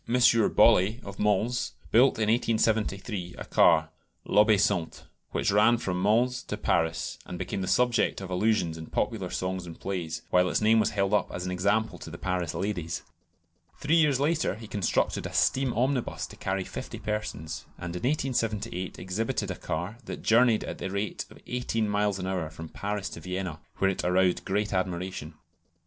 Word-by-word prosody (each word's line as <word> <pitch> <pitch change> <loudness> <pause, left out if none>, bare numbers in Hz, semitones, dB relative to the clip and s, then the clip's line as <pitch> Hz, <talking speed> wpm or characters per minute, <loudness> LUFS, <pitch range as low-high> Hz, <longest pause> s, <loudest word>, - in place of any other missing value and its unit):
Bollée, 115 -3 +4
of 100 -1 -9
Mans, 105 +4 +1 0.2
built 130 +4 +5
in 110 -1 0
1873 110 -4 0
a - - -6
car, - - +4 0.4
"l'Obéissante," 105 -4 +3 0.3
which - - 0
ran 105 +4 +5
from 90 -5 -2
Mans 120 +5 +2
to 105 - -5
Paris; 80 -5 0
and 90 - -6
became 95 +2 -3
the 95 - -3
subject 125 +2 +2
of 95 -1 -7
allusions 90 -4 +1
in 80 - -8
popular - - -2
songs 95 -1 -3
and 85 - -10
plays, 85 -4 -4
while 90 0 +4
its - - +1
name 110 +1 +4
was 110 0 +2
held 100 0 0
up 105 - +2
as 90 - -4
an 90 - -2
example 100 +5 0
to - - -8
the - - -8
Paris 90 -3 -2
ladies. 90 -4 -3 0.7
Three 150 +2 0
years 150 -5 +3
later 155 - +1
he 110 +1 -10
constructed 100 -4 0
a - - -10
steam 130 -1 +2
omnibus 125 +2 0
to - - -11
carry 95 0 -2
fifty - - -7
persons, 105 -8 -4
and 85 0 -6
in 90 - -4
1878 115 - -1
exhibited 105 +2 -2
a - - -4
car 90 +10 -4
that - - -7
journeyed 115 -1 +4
at - - -6
the - - -3
rate 100 +2 -3
of - - -15
eighteen 120 -3 -1
miles 105 -1 +1
an 90 - -4
hour 90 -4 -2
from 80 0 -9
Paris 100 -1 -3
to - - -8
Vienna, 90 -2 -4 0.2
where 95 0 +3
it 95 - -4
aroused 90 0 +2
great 105 +1 -1
admiration. 90 -3 -3
100 Hz, 175 wpm, -28 LUFS, 90-115 Hz, 0.7 s, built